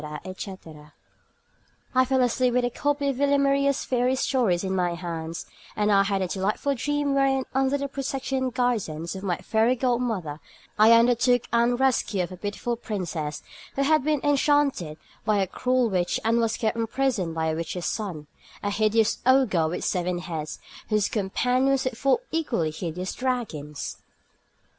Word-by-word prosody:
etc. 165 Hz, -5 st, -9 dB, 1.0 s
I 255 Hz, 0 st, +4 dB
fell 260 Hz, 0 st, +2 dB
asleep 250 Hz, 0 st, +1 dB
with 250 Hz, -1 st, +3 dB
a 245 Hz, -, -1 dB
copy 285 Hz, +2 st, 0 dB
of 270 Hz, -, -2 dB
Villamaria's 280 Hz, 0 st, +2 dB
fairy 250 Hz, 0 st, +1 dB
stories 235 Hz, -10 st, +1 dB
in 190 Hz, 0 st, -1 dB
my 175 Hz, -2 st, 0 dB
hands, 165 Hz, -1 st, -5 dB, 0.3 s
and 210 Hz, 0 st, +1 dB
I 200 Hz, -1 st, +6 dB
had 195 Hz, -1 st, 0 dB
a -, -, -1 dB
delightful 205 Hz, +9 st, -1 dB
dream 290 Hz, +2 st, -1 dB
wherein, 270 Hz, -1 st, +2 dB
under 270 Hz, +1 st, +2 dB
the 280 Hz, 0 st, -3 dB
protection 270 Hz, -1 st, -2 dB
and 255 Hz, -, -1 dB
guidance 205 Hz, -11 st, -1 dB
of 190 Hz, -, -7 dB
my 185 Hz, -3 st, -1 dB
fairy 225 Hz, +3 st, +2 dB
godmother, 235 Hz, -, -1 dB, 0.4 s
I 220 Hz, +2 st, +8 dB
undertook 245 Hz, +1 st, +4 dB
the 235 Hz, +1 st, +3 dB
rescue 240 Hz, -7 st, +1 dB
of 175 Hz, -, -6 dB
a 185 Hz, -, -8 dB
beautiful 210 Hz, +5 st, -3 dB
princess 175 Hz, -9 st, -4 dB, 0.3 s
who 275 Hz, -, +1 dB
had 310 Hz, 0 st, +3 dB
been 300 Hz, -1 st, +1 dB
enchanted 285 Hz, -, +2 dB, 0.3 s
by 215 Hz, -2 st, +2 dB
a 195 Hz, -, +2 dB
cruel 250 Hz, +5 st, +1 dB
witch 180 Hz, -4 st, 0 dB
and 230 Hz, +1 st, +3 dB
was 225 Hz, -1 st, 0 dB
kept 220 Hz, 0 st, 0 dB
in 225 Hz, -1 st, 0 dB
prison 235 Hz, -9 st, 0 dB
by 160 Hz, 0 st, 0 dB
the -, -, -2 dB
witch's 170 Hz, +2 st, -4 dB
son, 180 Hz, -9 st, -3 dB, 0.4 s
a 205 Hz, -, 0 dB
hideous 215 Hz, +1 st, +2 dB
ogre 250 Hz, -11 st, +3 dB
with 165 Hz, -, -3 dB
seven 180 Hz, 0 st, 0 dB
heads, 165 Hz, -4 st, -5 dB, 0.3 s
whose 210 Hz, -2 st, +2 dB
companions 250 Hz, +6 st, +1 dB
were 255 Hz, -, +1 dB
four 270 Hz, -, +1 dB
equally 240 Hz, -, 0 dB
hideous 175 Hz, +3 st, -4 dB
dragons. 215 Hz, -, -3 dB
230 Hz, 165 wpm, -25 LUFS, 185-265 Hz, 1.0 s, I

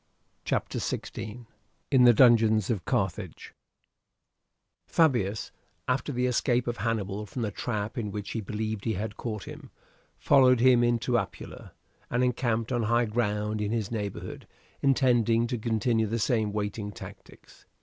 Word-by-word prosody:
CHAPTER -, -, -1 dB
XVI: 115 Hz, +2 st, -5 dB, 0.5 s
IN 130 Hz, -3 st, +6 dB
THE 120 Hz, -, +8 dB
DUNGEONS 110 Hz, -3 st, +5 dB
OF 100 Hz, -6 st, -3 dB
CARTHAGE 95 Hz, -7 st, -3 dB, 1.3 s
Fabius, 120 Hz, -, +1 dB, 0.4 s
after 130 Hz, +3 st, 0 dB
the 125 Hz, -1 st, 0 dB
escape 125 Hz, 0 st, +1 dB
of 120 Hz, 0 st, -3 dB
Hannibal 105 Hz, -1 st, -2 dB
from 120 Hz, +5 st, -4 dB
the 105 Hz, -, -2 dB
trap 110 Hz, +3 st, -3 dB
in 105 Hz, -3 st, -3 dB
which 100 Hz, 0 st, -6 dB
he 115 Hz, -, -3 dB
believed 110 Hz, 0 st, -4 dB
he 110 Hz, -, 0 dB
had 105 Hz, +2 st, -4 dB
caught 110 Hz, -4 st, -5 dB
him, -, -, -10 dB, 0.5 s
followed 130 Hz, -3 st, +5 dB
him 125 Hz, -1 st, +5 dB
into 120 Hz, -1 st, +1 dB
Apulia, -, -, -8 dB, 0.4 s
and 120 Hz, +1 st, +1 dB
encamped 120 Hz, -2 st, 0 dB
on 120 Hz, -2 st, +1 dB
high 115 Hz, +2 st, +2 dB
ground 105 Hz, -1 st, -1 dB
in 105 Hz, 0 st, -1 dB
his 110 Hz, -3 st, -2 dB
neighbourhood 105 Hz, -4 st, -5 dB, 0.3 s
intending 120 Hz, -4 st, +3 dB
to 120 Hz, +1 st, -2 dB
continue 110 Hz, 0 st, +1 dB
the 115 Hz, +3 st, -2 dB
same 110 Hz, -2 st, +1 dB
waiting 105 Hz, 0 st, -3 dB
tactics. -, -, -13 dB
115 Hz, 145 wpm, -28 LUFS, 105-120 Hz, 1.3 s, THE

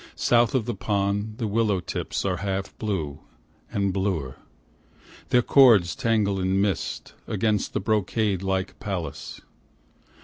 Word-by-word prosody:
South 120 Hz, 0 st, +3 dB
of 120 Hz, -5 st, +1 dB
the 120 Hz, -, -2 dB
pond 100 Hz, +1 st, -1 dB
the 120 Hz, -, -2 dB
willow 105 Hz, -2 st, +1 dB
tips 85 Hz, -, -4 dB
are 95 Hz, -2 st, 0 dB
half 95 Hz, -1 st, -3 dB
blue 85 Hz, -10 st, -3 dB, 0.5 s
and 100 Hz, -2 st, 0 dB
bluer, 90 Hz, -10 st, -2 dB, 0.9 s
Their 125 Hz, -1 st, +4 dB
cords 110 Hz, -13 st, +5 dB
tangle 105 Hz, -4 st, +1 dB
in 95 Hz, +1 st, +1 dB
mist, 100 Hz, -5 st, -2 dB
against 110 Hz, -2 st, 0 dB
the -, -, 0 dB
brocade 105 Hz, -1 st, 0 dB
like 95 Hz, -1 st, -2 dB
palace. 95 Hz, -6 st, -5 dB
100 Hz, 130 wpm, -25 LUFS, 95-110 Hz, 0.9 s, cords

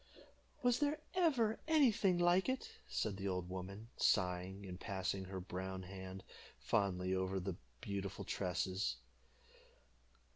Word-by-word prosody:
"Was 245 Hz, -1 st, +4 dB
there 295 Hz, +1 st, +2 dB
ever 270 Hz, -12 st, +3 dB
any 305 Hz, -6 st, +6 dB
thing 190 Hz, -4 st, +3 dB
like 175 Hz, +4 st, +4 dB
it?" 260 Hz, 0 st, -2 dB, 0.2 s
said 105 Hz, -3 st, -1 dB
the 100 Hz, 0 st, -2 dB
old 90 Hz, -2 st, -1 dB
woman, 95 Hz, +4 st, -6 dB
sighing, 90 Hz, +2 st, +2 dB
and 90 Hz, -1 st, -6 dB
passing 95 Hz, 0 st, -2 dB
her 95 Hz, 0 st, -4 dB
brown 95 Hz, 0 st, -4 dB
hand 95 Hz, 0 st, -7 dB, 0.3 s
fondly 95 Hz, -2 st, +1 dB
over 95 Hz, +1 st, 0 dB
the 95 Hz, -1 st, -2 dB, 0.3 s
beautiful 100 Hz, -1 st, -3 dB
tresses. 90 Hz, -6 st, 0 dB
95 Hz, 125 wpm, -38 LUFS, -, 0.3 s, any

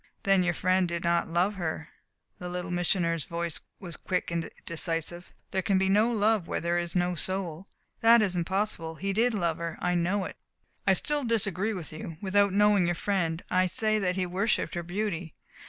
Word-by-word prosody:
"Then 195 Hz, -2 st, +4 dB
your 175 Hz, -1 st, +1 dB
friend 185 Hz, 0 st, +2 dB
did 170 Hz, 0 st, -3 dB
not 170 Hz, 0 st, +2 dB
love 175 Hz, +5 st, +1 dB
her." 160 Hz, -4 st, -4 dB, 0.5 s
The 180 Hz, -, -5 dB
Little 180 Hz, +1 st, -4 dB
Missioner's 170 Hz, -2 st, +1 dB
voice 170 Hz, -2 st, -3 dB, 0.2 s
was 175 Hz, -4 st, -7 dB
quick 180 Hz, -2 st, -2 dB
and 170 Hz, -1 st, -2 dB, 0.2 s
decisive. 170 Hz, +1 st, -3 dB, 0.2 s
"There 190 Hz, -, 0 dB
can 195 Hz, +1 st, +2 dB
be 190 Hz, 0 st, +2 dB
no 215 Hz, +4 st, +4 dB
love 215 Hz, -4 st, +2 dB
where -, -, -1 dB
there 170 Hz, +1 st, 0 dB
is 170 Hz, 0 st, -4 dB
no 180 Hz, 0 st, +2 dB
soul." 185 Hz, 0 st, -2 dB, 0.3 s
"That 230 Hz, +1 st, +7 dB
is 200 Hz, -4 st, +1 dB
impossible. 175 Hz, -2 st, -1 dB
He 195 Hz, +4 st, -2 dB
did 230 Hz, +3 st, +2 dB
love 170 Hz, -5 st, 0 dB
her. 170 Hz, -1 st, -4 dB
I 180 Hz, -, 0 dB
know 185 Hz, +3 st, +1 dB
it." -, -, -8 dB, 0.5 s
"I -, -, +6 dB
still 295 Hz, -2 st, 0 dB
disagree 220 Hz, -3 st, 0 dB
with 165 Hz, -4 st, -6 dB
you. 155 Hz, +1 st, -7 dB
Without 200 Hz, 0 st, +3 dB
knowing 205 Hz, -2 st, +4 dB
your 175 Hz, -, +1 dB
friend, 170 Hz, -4 st, -1 dB
I 185 Hz, 0 st, +3 dB
say 215 Hz, +4 st, +1 dB
that 180 Hz, -2 st, 0 dB
he 185 Hz, -1 st, 0 dB
worshipped 190 Hz, +5 st, 0 dB
her 175 Hz, -, -2 dB
beauty. 175 Hz, -2 st, -3 dB
180 Hz, 195 wpm, -28 LUFS, 170-200 Hz, 0.5 s, That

